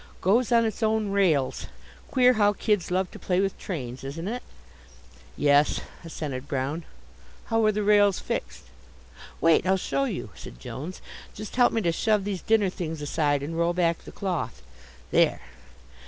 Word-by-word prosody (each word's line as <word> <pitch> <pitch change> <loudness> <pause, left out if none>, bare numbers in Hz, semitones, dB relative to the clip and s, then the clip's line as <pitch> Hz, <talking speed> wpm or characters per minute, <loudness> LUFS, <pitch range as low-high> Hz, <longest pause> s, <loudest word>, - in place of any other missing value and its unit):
"Goes 230 +7 +2
on 230 -1 +5
its 220 0 -3
own 220 -1 +1
rails. 170 -10 +1 0.4
Queer 255 -1 +5
how 205 -2 +3
kids 205 -3 0
love 185 0 0
to - - -11
play 180 -1 0
with 195 0 0
trains, 130 -9 -5
isn't 160 +6 -5
it?" 245 +4 -3 1.0
"Yes," 145 0 +4 0.2
assented 145 -5 -5
Brown. 140 +5 -2 0.7
"How 225 0 +3
are - - +5
the 210 0 -1
rails 205 -2 +4
fixed?" - - -4 0.8
"Wait, 165 -1 +4
I'll 190 +1 +4
show 275 +8 -1
you," 185 - -4
said - - -11
Jones. 155 - -7 0.3
"Just 210 0 -7
help 245 -1 +5
me 225 - 0
to 170 - +2
shove 210 +4 +1
these 195 -3 -3
dinner 215 -4 +2
things 160 -3 -5
aside 145 -1 0
and 160 +3 -4
roll 170 +1 +1
back 170 -2 +1
the - - -12
cloth. 185 - -3 0.5
There! - - +3
185 Hz, 165 wpm, -26 LUFS, 155-210 Hz, 1.0 s, on